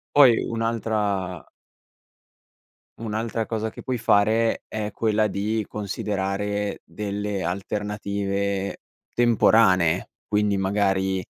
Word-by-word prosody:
Poi 130 -6 +8
un'altra 105 -6 -1 1.5
un'altra 115 0 -2
cosa 110 0 -2
che - - -10
puoi 130 -2 -1
fare 110 +1 +2
è 105 -1 -3
quella 110 -1 +1
di 105 +2 -1
considerare 100 0 -2
delle 105 -1 -3
alternative 100 0 -2 0.4
temporanee, 100 -7 +4
quindi 105 -1 +1
magari 95 -1 +1
105 Hz, 85 wpm, -24 LUFS, 100-110 Hz, 1.5 s, Poi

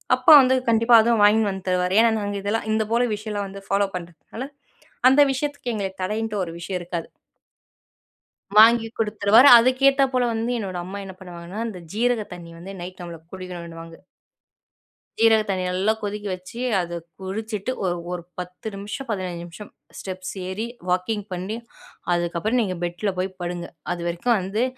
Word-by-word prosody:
அப்பா 255 +4 +4
வந்து 260 0 +3
கண்டிப்பா 230 +1 +3
அத 235 +2 +2
வாங்கினு 210 0 +5
வந்து 190 -1 -6
தருவாரு. 180 0 +1
ஏனா 230 - +6
நாங்க 205 0 -3
இதெல்லா 205 +3 -1
இந்த 220 0 +2
போல 235 +1 +3
விஷயம்லா 210 -1 -4
வந்து 195 0 -9
ஃபாலோ 200 0 +2
பண்ணுறதுனால 180 - -7 0.6
அந்த 275 +3 +5
விஷயத்துக்கு 285 -3 -3
எங்கள 195 -2 -2
தடைன்ட்டு 215 +1 -2
ஒரு 165 - -5
விஷயம் 180 +1 -4
இருக்காது. 175 -1 -5 1.5
வாங்கி 225 +1 +7
குடுத்துருவாரு 220 +3 +5
அதுக்கேத்தா 270 +3 +4
போல 250 -1 +2
வந்து 225 +2 -1
என்னோட 190 -4 -4
அம்மா 195 +2 -6
என்ன 190 - -8
பண்ணுவாங்கன்னா, 175 +2 -8
அந்த 195 -5 -7
ஜீரக 235 0 +1
தண்ணி 170 -1 -10
வந்து 190 +3 -9
நைட் 185 +1 -8
நம்மள 170 -2 -8
குடிக்கணுன்னுவாங்க. 170 -3 -8 1.2
ஜீரக 225 -1 +5
தண்ணி 185 -1 0
நல்லா 190 +4 +1
கொதிக்க 205 0 -4
வச்சு, 185 +6 -9 0.2
அத 175 -1 -3 0.3
குடிச்சிட்டு 210 +4 -4
ஒரு 180 -2 0 0.2
ஒரு 175 -1 -4 0.2
10 180 +4 -7
நிமிஷம் 205 +7 -6
15 185 -5 -3
நிமிஷம் 175 +5 -11 0.3
ஸ்டெப்ஸ் 185 -1 -6 0.2
ஏறி 210 +5 -3 0.2
வாக்கிங் 190 +3 -1
பண்ணி 185 +4 -4 0.6
அதுக்கப்புறம் 175 +7 0
நீங்க 190 -5 -2
பெட்ல 175 +4 -2
போய் 185 +1 -1
படுங்க. 175 0 -4 0.3
அதுவரைக்கு 175 +5 -3
வந்து 195 +5 -1
200 Hz, 155 wpm, -23 LUFS, 180-225 Hz, 1.5 s, வாங்கி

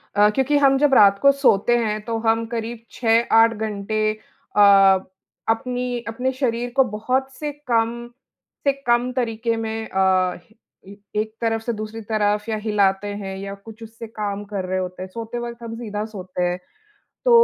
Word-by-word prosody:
अ, 210 0 +6
क्योंकि 275 +2 +2
हम 275 -1 +4
जब 290 -1 +3
रात 200 -5 +7
को 280 - +7
सोते 240 -5 +3
हैं 215 -2 -1
तो 230 -1 -2
हम 225 0 +1
करीब 230 0 -4
6-8 230 -1 +4
घंटे 215 0 -1
अ, 215 -1 -4 0.9
अपनी 245 +1 -1
अपने 250 +3 -1
शरीर 245 -2 -1
को 270 - +6
बहुत 255 +5 -1
से 300 -1 -4 0.2
कम 235 0 0 0.6
से - - +7 0.2
कम 240 +1 +2
तरीके 230 -2 -1
में 225 0 -4
अ, 185 -1 +2 0.5
ए - - -10
ए 205 +1 -6
एक 215 0 -6
तरफ़ 225 -1 0
से 235 - -2
दूसरी 215 +1 -6
तरफ़ 210 0 0
या 220 - -1
हिलाते 205 -2 +1
हैं 195 -1 -5
या 195 +1 -6
कुछ 220 +3 -13
उससे 225 +1 -9
काम 205 -2 -4
कर 200 -2 -4
रहे 185 +1 -2
होते 185 0 -5
हैं, 190 - -8
सोते 230 +4 -6
वक़्त 235 0 -7
हम 225 -1 -6
सीधा 210 -3 -4
सोते 185 -4 -5
हैं। 175 0 0 0.7
तो - - +3
225 Hz, 175 wpm, -22 LUFS, 205-240 Hz, 0.9 s, रात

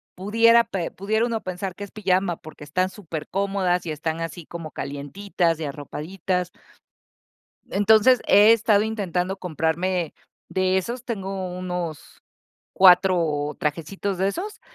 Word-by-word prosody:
pudiera 230 +5 +4
pe 185 -6 -3
pudiera 220 +4 0
uno 225 -2 -2
pensar 185 0 -5
que 205 - -7
es 200 - -9
pijama 190 -4 0
porque 155 -1 -12
están 185 +6 0
supercómodas, 185 +1 -2
y 160 - -3
están 160 +2 -3
así 165 0 -6
como 165 -2 -8
calientitas 165 +4 -2
y 160 - -3
arropaditas. 175 +5 -4 1.2
Entonces, 220 +4 +5
he 210 +3 +7
estado 215 -2 +3
intentando 195 -4 -2
comprarme 175 0 -1 0.4
de 185 0 +1
esos, 235 +6 -3
tengo 195 -5 -4
unos 180 -3 -5 0.5
4 175 -6 +4
trajecitos 170 +6 -2
de 190 +2 +1
esos. 390 - -6
185 Hz, 125 wpm, -24 LUFS, 165-200 Hz, 1.2 s, he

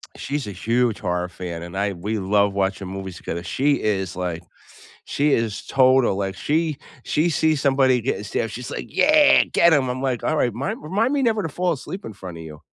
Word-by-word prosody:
she's 145 -4 -4
a - - -4
huge 115 +4 0
horror 90 -2 -2
fan, 85 -1 -6
and 85 +2 -7
I 100 0 0
we 105 +5 -3
love 100 +1 +2
watching 95 -1 -1
movies 95 -1 -6
together. 85 +1 -5
She 145 +2 +1
is, 95 -5 -1
like, 90 -2 -4 0.6
she 145 0 +1
is 115 -3 -1
total 130 -5 +4
like, 95 -1 -3
she 155 +5 0 0.3
she 155 +3 +1
sees 155 -2 +1
somebody 135 -2 +3
getting 110 -3 -2
stabbed, 105 +2 -2
she's 125 +2 -7
like, - - -5
"Yeah, 300 0 +5
get 170 -1 +4
'em." 130 -4 +2
I'm 130 +1 -3
like, 130 -3 -1
"Alright, 135 -7 +1
mind 130 +5 -4
remind 215 - 0
me 285 - +1
never 220 -3 +2
to 160 - -3
fall 180 +5 -1
asleep 185 +7 -7
in 110 - -7
front 90 -3 -9
of 80 - -8
you." 75 -1 -11
115 Hz, 205 wpm, -22 LUFS, 95-145 Hz, 0.6 s, Yeah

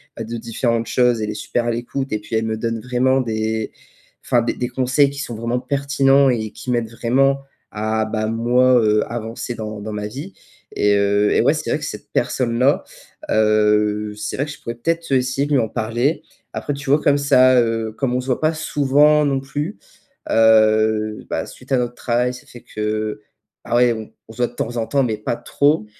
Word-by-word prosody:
bah, 115 - -5
de 115 +1 -5
différentes 115 0 -1
choses, 125 -2 +2
elle 105 - -2
est - - -3
super 115 +3 -2
à 120 - +1
l'écoute 125 +3 -4
et 105 - 0
puis 110 +2 -6
elle 110 - -1
me 110 0 -1
donne 115 0 -2
vraiment 125 +2 +1
des 110 -2 -2 0.5
enfin, 120 - +3
des 115 - 0
des 125 - -2
conseils 130 +3 +2
qui 140 0 -8
sont 120 -4 -5
vraiment 115 +2 -2
pertinents 140 +1 +2
et 110 -4 -1
qui - - -9
m'aident 120 -2 0
vraiment 135 +4 +1 0.3
à 110 +1 -1
bah, 110 0 -2
moi, 120 +3 +3
heu, 105 -1 +3
avancer 115 +1 -5
dans 110 -1 -6
dans 110 +1 -6
ma 105 0 -3
vie 145 - -8 0.4
et 105 0 +3
heu, 100 +1 +2
eh - - +3
ouais, - - +4
c'est - - -4
vrai - - 0
que - - -5
cette - - -8
personne-là, 125 +3 +1 0.5
heu, 105 -1 +2
c'est 105 0 -4
vrai 140 - 0
que 150 - -7
je 140 - -11
pourrais 115 - -5
peut-être, 165 +6 -2
heu, - - +6
essayer 130 +2 -1
de 145 - -1
lui 140 - +4
en 110 - -2
parler. 120 +7 -1 0.3
Après, 145 - -3
tu 140 -1 -7
vois, 145 +2 +5
comme 145 0 +3
ça, 130 -2 +5
heu, 115 -1 -1
comme 125 +2 -2
on - - +1
se - - -10
voit 125 - -1
pas 155 +1 +2
souvent 150 -1 +3
non 135 -2 +1
plus, 145 +7 -4 0.5
heu, 110 -1 +3
bah, - - -2
suite - - -14
à 135 - +4
notre 120 -1 -2
travail, 125 +1 0
ça 125 - -12
fait 120 - -13
que 105 0 -3 0.4
ah 120 - -1
ouais, 120 -1 +4
on 110 -1 -8 0.2
on - - -10
se - - -17
voit 120 - +2
de 120 - -16
temps 120 0 -3
en 115 -1 -1
temps 140 -1 +2
mais 115 -4 -1
pas 105 +2 -2
trop 145 -4 +1
120 Hz, 220 wpm, -20 LUFS, 110-135 Hz, 0.5 s, heu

